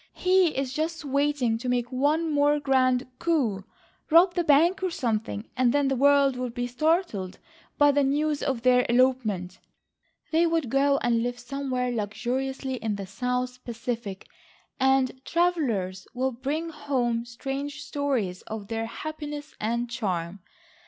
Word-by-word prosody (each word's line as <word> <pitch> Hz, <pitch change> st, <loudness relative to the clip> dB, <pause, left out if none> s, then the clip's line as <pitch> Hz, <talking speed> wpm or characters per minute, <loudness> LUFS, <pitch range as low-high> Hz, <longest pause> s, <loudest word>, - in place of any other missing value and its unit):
He 365 Hz, -4 st, +3 dB
is 270 Hz, -1 st, -2 dB
just 320 Hz, +1 st, -3 dB
waiting 280 Hz, -4 st, +1 dB
to 250 Hz, +1 st, -3 dB
make 245 Hz, 0 st, 0 dB
one 295 Hz, +6 st, +1 dB
more 290 Hz, 0 st, +3 dB
grand 260 Hz, -2 st, +2 dB
coup, 265 Hz, -, 0 dB, 0.5 s
rob 345 Hz, +3 st, +6 dB
the 350 Hz, -, 0 dB
bank 335 Hz, +6 st, +4 dB
or 375 Hz, -, 0 dB
something 225 Hz, -7 st, -2 dB
and 255 Hz, -2 st, +3 dB
then 285 Hz, 0 st, +2 dB
the 270 Hz, -, +1 dB
world 280 Hz, 0 st, +4 dB
will 250 Hz, 0 st, -3 dB
be 245 Hz, +1 st, -3 dB
startled 250 Hz, -, 0 dB, 0.4 s
by 290 Hz, 0 st, +6 dB
the 285 Hz, 0 st, +2 dB
news 295 Hz, +2 st, +1 dB
of 260 Hz, -4 st, -2 dB
their 250 Hz, -1 st, +5 dB
elopement. 235 Hz, -8 st, +1 dB, 0.7 s
They 335 Hz, +1 st, +4 dB
will 330 Hz, 0 st, +2 dB
go 275 Hz, +3 st, +2 dB
and 235 Hz, -1 st, +2 dB
live 245 Hz, +1 st, -2 dB
somewhere 250 Hz, 0 st, -3 dB
luxuriously 255 Hz, +4 st, -2 dB
in 220 Hz, -3 st, -2 dB
the 200 Hz, -1 st, -5 dB
south 250 Hz, +5 st, -3 dB
Pacific, 230 Hz, -4 st, -5 dB, 0.5 s
and 265 Hz, -1 st, +2 dB
travellers 250 Hz, -, 0 dB
will 260 Hz, +1 st, 0 dB
bring 285 Hz, +7 st, -3 dB
home 255 Hz, -7 st, -1 dB
strange 275 Hz, +4 st, -5 dB
stories 270 Hz, -11 st, -2 dB
of 215 Hz, -2 st, -6 dB
their 225 Hz, 0 st, -2 dB
happiness 295 Hz, +3 st, -6 dB
and 235 Hz, +3 st, -1 dB
charm. 195 Hz, -6 st, -3 dB
260 Hz, 145 wpm, -26 LUFS, 235-290 Hz, 0.7 s, rob